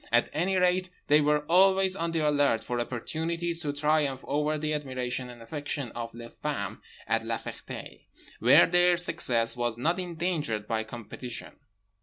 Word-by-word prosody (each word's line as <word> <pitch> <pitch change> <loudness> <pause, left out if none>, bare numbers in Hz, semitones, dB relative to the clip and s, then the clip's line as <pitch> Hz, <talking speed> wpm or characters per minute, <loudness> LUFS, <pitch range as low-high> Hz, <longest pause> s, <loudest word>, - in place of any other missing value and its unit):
At 120 0 +3
any 180 +5 +1
rate 180 0 +2 0.2
they 150 +1 +6
were 150 0 +2
always 190 +2 +4
on 170 -3 -2
the 160 -2 +1
alert 145 -6 +2
for 120 0 -2
opportunities 165 +8 -2
to 145 - -1
triumph 145 -2 +1
over 150 +2 0
the 155 0 -2
admiration 130 -3 -3
and 120 -1 -11
affection 145 0 -4
of 115 -1 -6
les 115 0 -9
femmes - - -3 0.3
at - - 0
La - - -2
Ferté, - - -9 0.3
where - - +7
their 175 0 +4
success 125 -10 +1
was 120 -2 -1
not 165 +9 0
endangered 165 - -2
by 110 -1 0
competition. 120 +2 -7
150 Hz, 160 wpm, -28 LUFS, 120-170 Hz, 0.3 s, where